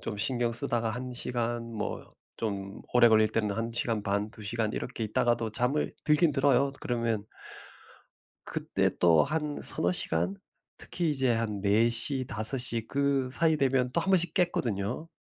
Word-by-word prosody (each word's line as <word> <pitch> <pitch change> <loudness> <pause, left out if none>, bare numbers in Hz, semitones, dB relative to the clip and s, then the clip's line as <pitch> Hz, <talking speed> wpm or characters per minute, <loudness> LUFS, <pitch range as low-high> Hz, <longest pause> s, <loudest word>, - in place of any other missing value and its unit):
좀 105 - -4
신경 120 0 0
쓰다가 115 -1 0
1 125 +2 -5
시간 120 -1 -3
뭐 110 - -5 0.3
좀 100 -3 -4
오래 120 -1 +6
걸릴 110 -1 +5
때는 105 -2 -1
1 115 +1 -2
시간 115 -2 -1
반, 100 +1 -1
2 110 - -12
시간 110 0 -1
이렇게 120 -2 -4
있다가도 115 +1 +1
잠을 125 +7 0
들기는 150 +1 +3
들어요. 135 0 +3
그러면 115 -4 -1 1.2
그때 - - 0
또 85 -2 +5
한 150 0 -2
3-4 90 +1 +1
시간 85 +3 0 0.4
특히 170 -3 -2
이제 135 -4 +1
한 110 -3 -1
4:00 115 +6 +1
5:00 115 0 -2
그 140 -2 +1
사이 160 +2 +2
되면 130 -2 +1
또 - - +2
1 195 - -1
번씩 175 -4 +2
깼거든요. 130 - -1
120 Hz, 245 characters per minute, -29 LUFS, 110-135 Hz, 1.2 s, 오래